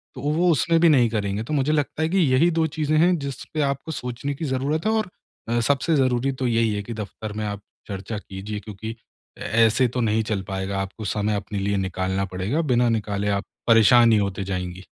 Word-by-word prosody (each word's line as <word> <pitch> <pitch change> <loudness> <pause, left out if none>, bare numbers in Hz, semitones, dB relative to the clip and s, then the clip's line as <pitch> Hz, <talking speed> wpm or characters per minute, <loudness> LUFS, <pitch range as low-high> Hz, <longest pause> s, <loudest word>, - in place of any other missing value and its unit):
तो - - -7
वो 160 +5 +2
उसमें 165 +2 +2
भी 170 - +6
नहीं 125 -6 +4
करेंगे 105 -1 -2
तो 135 - -5
मुझे 145 +1 +1
लगता 150 +1 -1
है 160 - +1
कि 195 - 0
यही 155 +1 +4
2 165 -1 +1
चीज़ें 155 0 +1
हैं 175 +1 +4
जिसपे 140 +2 -5
आपको 140 +2 -2
सोचने 125 0 -4
की 160 - -4
ज़रूरत 140 +6 -1
है - - +3
और 220 -4 0 0.4
अ, 120 0 +1
सबसे 145 +6 +1
ज़रूरी 130 0 +1
तो 125 - +2
यही 115 -2 +2
है 100 - -3
कि 115 - -6
दफ़्तर 105 0 -6
में 105 - -2
आप 100 0 -4 0.3
चर्चा 100 +2 -5
कीजिए 100 +1 -6
क्योंकि 110 +2 -7 0.4
ऐ - - -15 0.2
ऐसे 115 +3 +3
तो 125 +1 -3
नहीं 110 -1 +1
चल 105 -3 0
पाएगा। 95 0 -3
आपको 95 +3 -6
समय 105 +1 0
अपने 100 0 -4
लिए 100 +1 0
निकालना 95 0 -1
पड़ेगा 100 - -1
बिना 120 0 +3
निकाले 105 -2 -1
आप 100 0 0 0.2
परेशान 115 +1 +6
ही 110 - +5
होते 100 -1 -2
जाएँगी। 90 -1 -4
115 Hz, 215 wpm, -23 LUFS, 100-140 Hz, 0.4 s, भी